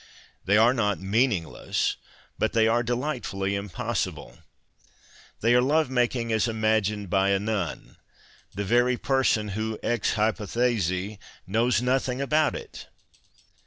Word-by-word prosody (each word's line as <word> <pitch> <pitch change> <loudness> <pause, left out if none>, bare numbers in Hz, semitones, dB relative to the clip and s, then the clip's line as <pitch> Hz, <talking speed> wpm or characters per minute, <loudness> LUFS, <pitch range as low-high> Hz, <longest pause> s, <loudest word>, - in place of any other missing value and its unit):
They 105 +2 +4
are 115 +3 +5
not 105 -5 0
meaningless, 100 -3 0 0.4
but - - 0
they 110 -1 +4
are 115 +2 +2
delightfully 120 -6 -2
impossible: 100 -3 -4 1.0
they 115 +2 +3
are 125 - +5
love 145 +1 +2
making 120 -2 0
as 110 +1 +2
imagined 110 -2 0
by 95 0 +3
a 100 - +3
nun, 105 -5 -4 0.6
the 100 +1 -3
very 120 +4 +2
person 130 -6 +1
who 110 +2 -3
ex 120 -2 0
hypotJiesi 105 -3 0 0.3
knows 115 +4 +1
nothing 130 0 0
about 150 +2 +1
it. - - -9
110 Hz, 125 wpm, -26 LUFS, 100-125 Hz, 1.0 s, are